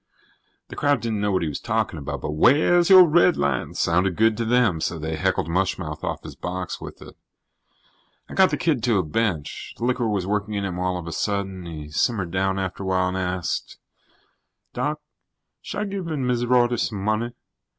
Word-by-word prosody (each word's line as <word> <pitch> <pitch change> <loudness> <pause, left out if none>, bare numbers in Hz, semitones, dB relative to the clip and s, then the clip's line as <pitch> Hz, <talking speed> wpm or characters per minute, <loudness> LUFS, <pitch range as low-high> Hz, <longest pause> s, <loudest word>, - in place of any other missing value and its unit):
The - - -8
crowd 145 -1 +2
didn't 110 -3 -2
know 105 0 +1
what 95 -2 +1
he - - -1
was 75 - -4
talking - - -1
about, - - -5
but - - -3
"wheah's 155 - +4
your 185 -1 +10
redlines" 155 - +2
sounded 90 +2 +1
good 110 +2 +3
to 115 - -1
them, 110 -8 +2
so 80 - -1
they 80 +1 -3
heckled 75 - 0
mush 95 +3 0
mouth 75 -4 -6
off - - -3
his - - -9
box 90 0 -5
with - - -9
it. - - -13 1.1
I - - -10
got 190 -1 +5
the - - -1
kid 155 -8 +1
to 115 -4 +3
a 95 - +2
bench. 85 -2 -2
The 120 - -3
liquor 125 -1 +1
was 100 -4 -1
working 105 +1 -2
in 100 -1 -1
him 90 -2 -4
all 90 0 -1
of 90 - -7
a 85 - -5
sudden. 95 -2 -2
He 75 -3 -7
simmered 90 +3 0
down 95 +1 0
after 95 0 -3
a - - -4
while 95 -1 +1
and 95 - -3
asked: 90 -1 -3 1.0
"Doc, - - -2 0.6
should - - -5
I've 205 -2 -3
given 165 -9 -3
Miz 120 -1 0
Rorty 120 -1 +3
some 110 - -1
money? 110 +3 -1
100 Hz, 200 wpm, -23 LUFS, 90-120 Hz, 1.1 s, your